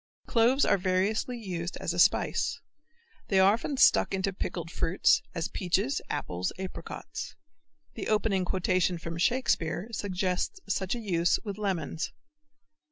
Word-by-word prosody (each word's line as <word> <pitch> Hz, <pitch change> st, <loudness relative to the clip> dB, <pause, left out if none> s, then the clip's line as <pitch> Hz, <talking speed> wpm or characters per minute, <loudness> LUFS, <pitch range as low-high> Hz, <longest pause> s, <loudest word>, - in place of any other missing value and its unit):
Cloves 250 Hz, +4 st, +3 dB
are -, -, +3 dB
variously 195 Hz, +6 st, 0 dB
used 180 Hz, -5 st, -4 dB
as 170 Hz, -, -2 dB
a 175 Hz, -, -3 dB
spice. 185 Hz, +3 st, +2 dB, 0.7 s
They 195 Hz, -, +3 dB
are 190 Hz, +2 st, +6 dB
often 265 Hz, +5 st, -3 dB
stuck 195 Hz, -, +5 dB
into 195 Hz, 0 st, -1 dB
pickled 170 Hz, -3 st, -4 dB
fruits, 170 Hz, +2 st, +3 dB
as 165 Hz, -2 st, -1 dB
peaches, 200 Hz, +10 st, 0 dB
apples, 90 Hz, +1 st, -2 dB
apricots. 190 Hz, 0 st, -6 dB, 0.6 s
The -, -, -5 dB
opening 210 Hz, -3 st, +2 dB
quotation 185 Hz, -1 st, +1 dB
from 165 Hz, 0 st, -6 dB
Shakespeare 195 Hz, -4 st, +1 dB
suggests 190 Hz, -, -2 dB
such 190 Hz, +3 st, -1 dB
a -, -, -4 dB
use 175 Hz, -6 st, +2 dB
with 205 Hz, -2 st, -5 dB
lemons. 170 Hz, -6 st, -2 dB
190 Hz, 135 wpm, -29 LUFS, 175-215 Hz, 0.7 s, are